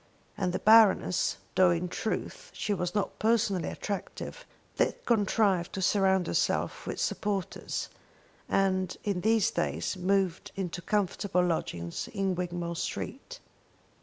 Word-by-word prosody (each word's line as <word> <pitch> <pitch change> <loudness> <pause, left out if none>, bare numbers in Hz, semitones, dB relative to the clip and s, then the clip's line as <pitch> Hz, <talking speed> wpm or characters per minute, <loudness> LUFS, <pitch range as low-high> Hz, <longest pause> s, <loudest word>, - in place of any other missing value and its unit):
And 185 -2 -1
the - - -1
Baroness, 215 -4 +5 0.2
though 185 -1 +5
in 170 +1 0
truth 215 +4 -4
she 210 - -1
was 180 0 -2
not 205 - -1
personally 215 -5 +2
attractive, 210 - -5 0.3
did - - +2
contrive 205 -5 +2
to 190 - -3
surround 190 -2 +3
herself - - 0
with - - -4
supporters, 195 -3 -2 0.6
and 185 -2 +1
in 200 -4 -1
these 220 0 +3
days - - -1
moved 185 -1 0
into 180 -2 -4
comfortable 190 -1 0
lodgings 85 - -2
in 195 -1 +1
Wigmore 175 -1 -3
Street. - - -5
190 Hz, 125 wpm, -29 LUFS, 180-205 Hz, 0.6 s, Baroness